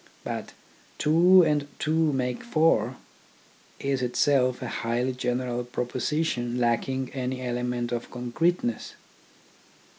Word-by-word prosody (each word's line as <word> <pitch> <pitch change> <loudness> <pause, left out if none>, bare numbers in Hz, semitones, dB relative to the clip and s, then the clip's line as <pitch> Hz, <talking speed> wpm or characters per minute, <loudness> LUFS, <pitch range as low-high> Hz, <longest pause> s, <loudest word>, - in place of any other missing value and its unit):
But - - -5 0.2
" - - -30
two 175 +4 +6
and 150 -2 +1
two 160 0 +1
make 125 -2 -2
four 155 - +2 0.4
" - - -30
is 135 -2 +1
itself 130 0 +2
a - - -3
highly 120 +3 -1
general 125 -1 -2
proposition 125 +1 -2
lacking 125 +2 0
any 130 -1 -3
element 125 -1 -2
of 120 -1 -3
con 125 0 -6
creteness. 165 -6 0
125 Hz, 120 wpm, -26 LUFS, 120-150 Hz, 0.4 s, two